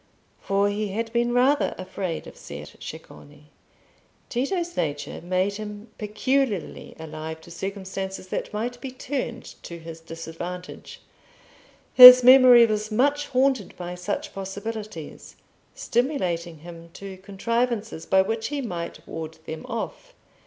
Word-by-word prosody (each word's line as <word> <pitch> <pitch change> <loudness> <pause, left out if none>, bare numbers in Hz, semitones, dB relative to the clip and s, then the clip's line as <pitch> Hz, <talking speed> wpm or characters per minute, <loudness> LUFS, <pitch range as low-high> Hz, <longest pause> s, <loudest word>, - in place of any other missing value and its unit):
For 200 +1 +1
he 205 +1 -1
had 225 +4 -4
been 240 0 +1
rather 260 +4 +2
afraid 185 -2 -4
of - - -11
Ser 75 +1 -9
Ceccone. 150 +1 -11 0.8
Tito's 345 +8 -2
nature 145 -2 -3
made 185 +3 0
him 210 +1 -8
peculiarly 215 0 -1
alive 160 0 -7
to 170 - -14
circumstances 190 +1 -5
that - - -3
might 240 +3 -4
be 270 - -5
turned 255 -1 -4 0.2
to 170 - -8
his 165 0 -9
disadvantage; 165 +2 -8 0.9
his 250 0 +12
memory 250 -2 +9
was 215 -1 -2
much 285 +6 +1
haunted 260 -5 +1
by 175 0 -5
such 180 +3 -4
possibilities, 200 -2 -7 0.4
stimulating 180 - -1
him 170 0 -11
to 195 -1 -9
contrivances 220 0 -2
by 190 0 +4
which 225 +2 -2
he 290 0 -3
might 175 -10 -5
ward 160 0 -7
them 160 0 -7
off. - - -6
205 Hz, 125 wpm, -25 LUFS, 175-245 Hz, 0.9 s, his